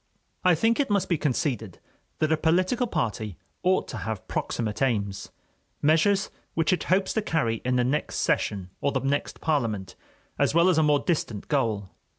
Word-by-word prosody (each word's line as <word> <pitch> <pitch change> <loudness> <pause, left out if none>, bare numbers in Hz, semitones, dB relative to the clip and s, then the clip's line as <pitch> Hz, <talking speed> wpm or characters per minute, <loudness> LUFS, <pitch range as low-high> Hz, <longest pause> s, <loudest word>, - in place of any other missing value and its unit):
I 180 -2 +5
think 225 - +2
it 280 - +1
must 200 -2 +1
be 170 - +2
conceded 125 - -1 0.4
that 155 0 +1
a - - +5
political 185 +10 +1
party 110 - -2 0.2
ought 185 +1 +2
to - - -5
have 110 -3 -5
proximate 110 -1 -2
aims, 100 -7 0 0.5
measures 165 +7 +3 0.2
which 165 +2 +2
it 180 - -1
hopes 190 +1 +2
to 220 - +1
carry 155 - 0
in 125 0 +1
the 125 - +3
next 135 +5 -1
session 95 -3 0
or 140 - +1
the 135 - 0
next 140 +1 -2
parliament, 110 - -1 0.4
as - - +2
well 170 +2 +5
as 170 -4 +3
a - - +5
more 150 -2 +3
distant 120 - -2
goal. 110 -9 0
145 Hz, 175 wpm, -26 LUFS, 115-180 Hz, 0.5 s, I